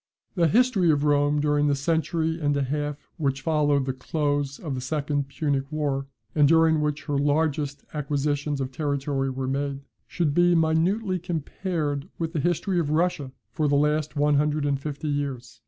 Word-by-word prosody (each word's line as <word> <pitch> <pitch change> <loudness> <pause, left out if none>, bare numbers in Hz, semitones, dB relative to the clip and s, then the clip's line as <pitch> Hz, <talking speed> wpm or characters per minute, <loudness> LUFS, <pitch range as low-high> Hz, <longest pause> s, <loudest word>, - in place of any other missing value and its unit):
The 170 -4 +3
history 220 - +3
of 145 -2 +3
Rome 145 0 +3
during 145 0 +2
the 145 - +2
century 160 +2 0
and 145 -1 +1
a 140 - +1
half 145 +2 -3
which 140 -4 -1
followed 145 -4 +2
the 130 - -1
close 145 +1 -1
of 150 -5 -5
the 130 - -3
second 145 +1 -1
Punic 140 -1 -2
war, 140 -3 -1 0.3
and 150 -2 +5
during 160 0 +4
which 150 0 -1
her 145 -2 -1
largest 145 -1 0
acquisitions 145 0 -1
of 130 -1 -3
territory 140 -1 -1
were 130 0 -3
made, 140 +1 -2 0.3
should 160 -5 0
be 175 +2 +4
minutely 180 +5 +1
compared 160 -2 -3
with 165 0 -3
the 160 - 0
history 175 +3 0
of 155 -4 -1
Russia 155 -4 0 0.2
for 150 +6 0
the 145 - +2
last 150 +1 +1
one 145 0 +3
hundred 150 0 +1
and 140 -1 0
fifty 150 +1 -5
years. 130 -5 -3
145 Hz, 175 wpm, -25 LUFS, 140-160 Hz, 0.3 s, and